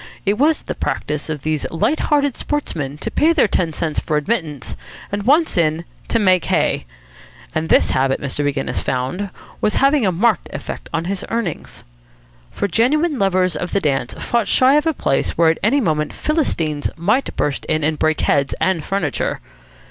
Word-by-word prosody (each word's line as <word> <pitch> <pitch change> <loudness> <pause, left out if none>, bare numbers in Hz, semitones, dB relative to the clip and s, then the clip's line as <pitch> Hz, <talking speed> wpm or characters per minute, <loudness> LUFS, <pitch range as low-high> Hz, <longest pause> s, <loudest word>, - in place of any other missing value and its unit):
It 205 +3 +1
was 310 +3 +3
the - - -4
practice 150 +1 -3
of 150 -3 -4
these 155 -2 -1
light 165 - 0
hearted 285 -3 +1
sportsmen 150 - -3
to - - -3
pay 325 +2 +3
their 295 -8 +4
ten 175 -4 0
cents 155 0 -2
for 155 - -1
admittance, 150 - -2 0.4
and 205 +1 -2
once 305 - +3
in, 160 +1 +1 0.2
to - - +1
make 185 -5 +3
hay. - - 0 0.7
And 160 +1 -2
this - - +4
habit, 135 0 +1
Mr. 140 +1 -3
Maginnis 140 -1 -1
found, 130 +11 -2 0.3
was 210 - +1
having 275 -1 +3
a 190 - +3
marked 210 +4 +1
effect - - -6
on 165 0 -2
his 195 +1 -3
earnings. 225 -8 -4 0.7
For 200 - -2
genuine 285 - +1
lovers 185 -3 +2
of 175 +3 -4
the 200 - +3
dance 135 -7 -1
fought 235 -2 -1
shy 260 +1 +5
of 300 +2 +3
a 320 - +2
place 135 - 0
where 165 -1 +5
at 160 - -4
any 245 +8 +3
moment 155 - 0
Philistines 165 - -1
might 215 +11 0
burst 145 -1 -1
in 155 0 0
and 155 0 0
break 155 0 +1
heads 140 -1 +1
and 185 -4 +1
furniture. 185 -8 -1
180 Hz, 180 wpm, -19 LUFS, 150-235 Hz, 0.7 s, shy